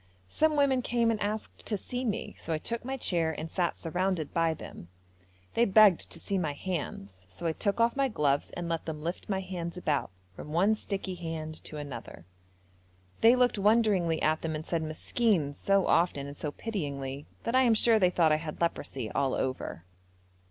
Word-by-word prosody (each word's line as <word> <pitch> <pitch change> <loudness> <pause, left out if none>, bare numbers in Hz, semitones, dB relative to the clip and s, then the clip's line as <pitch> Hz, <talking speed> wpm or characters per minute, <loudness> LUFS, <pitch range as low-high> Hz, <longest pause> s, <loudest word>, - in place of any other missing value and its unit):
Some 310 - +2
women 275 -3 +3
came 235 -1 +2
and 215 - -2
asked 210 +1 -3
to 210 - 0
see 250 +6 -4
me, 220 -5 -2
so - - -5
I - - +1
took 230 +9 -2
my 265 +2 -3
chair 170 -9 +1
and 160 +1 -5
sat 175 -3 0
surrounded 175 -2 -1
by 165 -1 +2
them. 85 - -10 0.7
They 235 - +4
begged 205 -3 +5
to - - -6
see 195 -2 -1
my 155 -5 -1
hands, 100 - -5
so 135 - -9
I 165 - +2
took 200 +6 -1
off 230 0 +3
my 275 -1 +2
gloves 145 - +1
and 175 -1 -3
let 165 -1 -2
them 155 -2 -5
lift 170 +5 -4
my 190 -1 0
hands 180 -2 -5
about 150 -6 0 0.3
from 150 - -8
one 195 +6 +4
sticky 200 -3 -3
hand 160 -3 -6
to 155 - -7
another. 130 - -8 0.9
They 230 +2 +7
looked 250 -4 +2
wonderingly 200 -6 +3
at 155 +1 +2
them 160 -1 -2
and 155 +1 -5
said 170 -2 -1
'Meskin' 160 0 0
so 195 +5 +2
often 165 -5 +2
and 140 0 -8
so 150 0 -3
pityingly 140 -9 -4 0.2
that 230 - -2
I 260 - +5
am 235 -3 +4
sure 225 0 +5
they 180 -3 +5
thought 170 -3 +3
I 155 - +4
had 155 -1 -6
leprosy 135 -8 -2
all 135 -2 +1
over. 130 -9 -3
175 Hz, 195 wpm, -29 LUFS, 155-215 Hz, 0.9 s, They